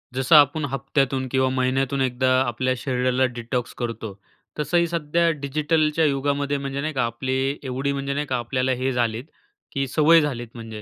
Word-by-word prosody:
जसं 130 Hz, +4 st, +4 dB
आपण 145 Hz, +1 st, +5 dB
हप्त्यातून 135 Hz, 0 st, -1 dB
किंवा 130 Hz, -1 st, +2 dB
महिन्यातून 130 Hz, +1 st, 0 dB
एकदा 130 Hz, 0 st, +1 dB
आपल्या 130 Hz, +1 st, 0 dB
शरीराला 125 Hz, 0 st, 0 dB
डिटॉक्स 120 Hz, 0 st, -4 dB
करतो. 115 Hz, -3 st, -4 dB, 0.5 s
तसंही 170 Hz, +4 st, +2 dB
सध्या 170 Hz, 0 st, +1 dB
डिजिटलच्या 155 Hz, +2 st, +1 dB
युगामध्ये 140 Hz, 0 st, 0 dB
म्हणजे 140 Hz, 0 st, -4 dB
नाही 155 Hz, +2 st, -3 dB
का? 130 Hz, -3 st, 0 dB
आपली 130 Hz, +4 st, -2 dB
एवढी 135 Hz, +2 st, -2 dB
म्हणजे 140 Hz, 0 st, -3 dB
नाही 145 Hz, +1 st, -2 dB
का? 130 Hz, -, -1 dB
आपल्याला 130 Hz, +2 st, -1 dB
हे 130 Hz, +1 st, 0 dB
झालेत 120 Hz, -2 st, -1 dB, 0.5 s
की 135 Hz, 0 st, -1 dB
सवय 160 Hz, +4 st, +5 dB
झालीत, 125 Hz, -5 st, -3 dB
म्हणजे 110 Hz, -2 st, -8 dB
135 Hz, 160 wpm, -23 LUFS, 125-145 Hz, 0.5 s, आपण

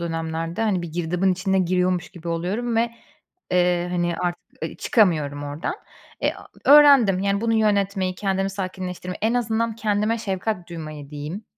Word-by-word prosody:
dönemlerde, 165 Hz, +2 st, -3 dB
hani, 195 Hz, -6 st, +1 dB
bir 165 Hz, -, -7 dB
girdabın 180 Hz, +3 st, +1 dB
içine 190 Hz, +1 st, 0 dB
giriyormuş 180 Hz, 0 st, +1 dB
gibi 175 Hz, -2 st, -9 dB
oluyorum 195 Hz, +8 st, -1 dB
ve, 230 Hz, +1 st, +2 dB, 0.6 s
eee, 180 Hz, -1 st, +2 dB
hani, 175 Hz, -1 st, 0 dB
artık, 175 Hz, -1 st, -2 dB, 0.2 s
ııı, -, -, -6 dB
çıkamıyorum 155 Hz, -, +2 dB
ordan. 145 Hz, -, -3 dB, 0.5 s
Eee, -, -, +1 dB
a -, -, -13 dB, 0.3 s
öğrendim, 280 Hz, -10 st, +7 dB
yani, 200 Hz, +1 st, 0 dB
bunu 225 Hz, 0 st, +1 dB
yönetmeyi, 200 Hz, -3 st, +1 dB
kendimi 195 Hz, 0 st, -1 dB
sakinleştirmeyi, 185 Hz, -2 st, -5 dB
en 225 Hz, +2 st, +2 dB
azından 230 Hz, -1 st, 0 dB
kendime 215 Hz, +1 st, 0 dB
şefkat 195 Hz, -3 st, -3 dB
duymayı, 155 Hz, -4 st, -8 dB
diyeyim. 150 Hz, +8 st, -6 dB
185 Hz, 150 wpm, -23 LUFS, 170-210 Hz, 0.6 s, öğrendim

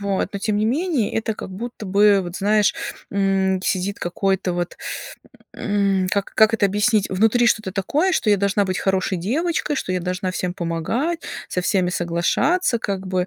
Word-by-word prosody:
Вот, 200 Hz, -1 st, -1 dB
но -, -, -1 dB
тем 210 Hz, +1 st, -1 dB
не 215 Hz, -, +1 dB
менее 285 Hz, -, 0 dB
это 225 Hz, 0 st, -1 dB
как -, -, -7 dB
будто 220 Hz, +2 st, -7 dB
бы, 200 Hz, +1 st, +4 dB
вот, 175 Hz, 0 st, -6 dB
знаешь, 210 Hz, +1 st, +2 dB, 0.4 s
м, 195 Hz, -1 st, +1 dB
сидит 195 Hz, +2 st, -1 dB
какой-то 190 Hz, +1 st, -1 dB
вот, 175 Hz, 0 st, -3 dB, 0.8 s
м, 200 Hz, -2 st, 0 dB
как 215 Hz, +3 st, +3 dB
это 220 Hz, -, +1 dB
объяснить- 210 Hz, +1 st, +1 dB
внутри 225 Hz, +5 st, +3 dB
что-то 215 Hz, -4 st, +1 dB
такое, 300 Hz, -, +1 dB
что 220 Hz, -, +1 dB
я 205 Hz, -, +4 dB
должна 200 Hz, +1 st, +1 dB
быть 185 Hz, -1 st, -2 dB
хорошей 190 Hz, -1 st, 0 dB
девочкой, 295 Hz, -, -1 dB
что 185 Hz, -8 st, -2 dB
я 180 Hz, -, 0 dB
должна 185 Hz, +1 st, -2 dB
всем 180 Hz, -1 st, -3 dB
помогать, 205 Hz, -, -2 dB, 0.3 s
со 180 Hz, -, -1 dB
всеми 180 Hz, -1 st, +1 dB
соглашаться, 180 Hz, -, +1 dB
как 195 Hz, -3 st, -3 dB
бы. 185 Hz, -1 st, 0 dB
200 Hz, 170 wpm, -21 LUFS, 185-220 Hz, 0.8 s, бы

